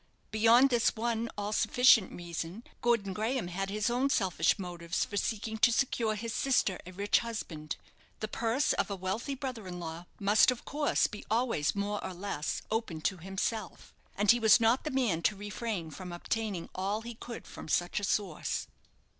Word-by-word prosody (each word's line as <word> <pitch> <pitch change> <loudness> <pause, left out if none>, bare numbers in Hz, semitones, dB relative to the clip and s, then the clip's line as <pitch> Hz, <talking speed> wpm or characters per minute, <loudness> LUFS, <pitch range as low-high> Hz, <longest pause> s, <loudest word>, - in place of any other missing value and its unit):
Beyond 230 +5 +6
this 240 -2 +3
one 230 0 -1
all 205 +1 -2
sufficient 245 -3 +5
reason, 175 +4 -6 0.2
Gordon 230 -5 +1
Graham 220 0 -1
had 195 +2 -3
his 210 +1 -1
own 250 +3 +2
selfish 185 -9 +2
motives 175 -2 -2
for 205 - -8
seeking 220 +2 -2
to 235 - +6
secure 230 -3 +1
his 225 +1 -4
sister 250 -9 +1
a - - -7
rich 200 +3 +2
husband. 160 -10 -5 0.4
The 215 - -2
purse 230 +5 +1
of - - 0
a 200 - -2
wealthy 195 +9 -3
brother 255 -7 -5
in 180 -1 -6
law 165 +1 -6
must, 205 +4 +5
of 250 -2 -2
course, 295 +1 +1
be 210 - -5
always 225 -10 +1
more 205 +1 -2
or 185 - -5
less 175 -5 -3
open 220 -8 -2
to 190 +3 0
himself; 195 +5 -4 0.2
and 205 0 +6
he 240 - +3
was 220 0 +7
not 230 +5 +3
the - - 0
man 240 - +1
to 210 - +2
refrain 205 -4 -4
from 180 +3 -8
obtaining 195 0 -3
all 200 +4 -1
he 235 +1 -7
could 235 +1 -8
from - - -9
such 175 +5 +1
a - - -8
source. 195 -5 -1
210 Hz, 180 wpm, -31 LUFS, 185-235 Hz, 0.4 s, was